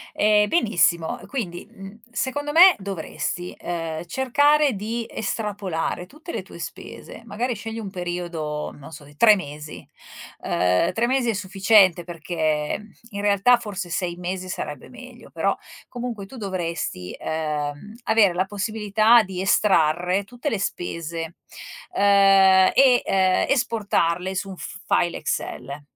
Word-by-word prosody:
Ehm, 210 0 +3
benissimo, 195 - +2
quindi, 185 -10 -5
uhm, 195 +3 -12
secondo 290 +4 -2
me 355 +3 +8
dovresti, 180 -2 -4
ehm, 165 -2 -4
cercare 285 - +3
di 225 +3 -4
estrapolare 200 -6 -3
tutte 310 - -11
le - - -4
tue - - -13
spese. - - -9
Magari 235 +3 -3
scegli 225 +1 -7
un 210 -4 -6
periodo, 175 -4 -4
non 140 +1 -13
so, 155 -1 -10
di 145 +1 -18
3 215 +4 +6
mesi, 150 -3 -8 0.5
uhm, 90 - +1
3 235 +1 0
mesi 255 -1 +1
è - - 0
sufficiente 195 -2 +3
perché 165 +1 -2 0.2
in 200 - -5
realtà 205 +4 +4
forse 195 -6 -5
6 175 0 -2
mesi 185 +1 -5
sarebbe 145 -6 -6
meglio, 250 -1 -13
però - - -1 0.3
comunque 235 -5 -6
tu 260 - -12
dovresti, 170 - -4
ehm, 150 +3 -4
avere 220 -4 +4
la 185 +2 0
possibilità 215 +2 +3
di 185 -2 -6
estrarre 180 -1 +2
tutte 245 +7 -5
le 220 - -1
spese, 170 -3 -4 0.6
ehm, 195 -1 +5
e, 260 -2 +5
ehm, 190 -1 +2
esportarle 190 -8 0
su 195 +1 -3
un 190 - -8
f-file 175 -2 -1
Excel. 140 +4 -4
195 Hz, 135 wpm, -23 LUFS, 170-225 Hz, 0.6 s, me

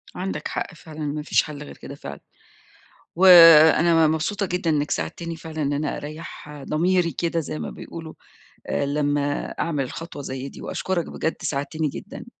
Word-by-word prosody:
عندك 190 +1 -4
حق - - -4
فعلًا، 155 -1 -12
ما 150 +1 -3
فيش 150 - +2
حَل 150 -1 -8
غير 145 - -11
كده 140 - -9
فعلًا. 70 - -9 1.0
وأنا 165 -2 +8
مبسوطة 160 +6 -1
جدًا 180 -1 -2
إنّك 150 -1 0
ساعدتني 170 -1 -3
فعلًا 160 -1 -7
إن 145 0 0
أنا 150 +1 -2
أريّح 150 -1 -9
ضميري 170 +3 +1
كده 170 -1 -1
زي 155 -1 -5
ما - - -4
بيقولوا 160 -1 -9 0.5
آآ 140 - 0
لمّا 145 0 0
أعمل 145 -6 -1
خطوة 165 -3 -7
زي 130 0 -5
دي - - -12
وأشكرك 185 -3 -2
بجد 160 - -2
ساعدتني 150 +2 -2
جدًا. - - -9
155 Hz, 160 wpm, -23 LUFS, 145-170 Hz, 1.0 s, وأنا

